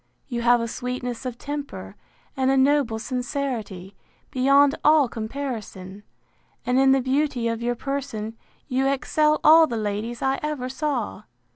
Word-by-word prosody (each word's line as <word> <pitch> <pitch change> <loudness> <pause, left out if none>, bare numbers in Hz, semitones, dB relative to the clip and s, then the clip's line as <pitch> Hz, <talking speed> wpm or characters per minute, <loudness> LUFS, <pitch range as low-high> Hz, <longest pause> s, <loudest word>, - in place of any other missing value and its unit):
You 240 -3 -3
have 240 0 +4
a 230 - -2
sweetness 250 +1 -4
of 240 -2 -6
temper, 285 +1 -6 0.4
and 265 -1 +1
a 270 - +3
noble 265 -4 +2
sincerity, 235 -6 -4 0.4
beyond 275 +2 +4
all 300 -3 +5
comparison; 220 -5 -6 0.6
and 250 +2 +2
in 270 0 +5
the 270 0 +4
beauty 260 -2 0
of 230 0 -2
your 240 +1 -1
person, 240 -5 -4 0.3
you 265 -1 +1
excel 300 +3 +1
all 320 +1 +7
the 235 - -3
ladies 215 +3 -3
I 270 0 +1
ever 295 -4 -3
saw. 265 -6 -3
255 Hz, 145 wpm, -24 LUFS, 230-280 Hz, 0.6 s, all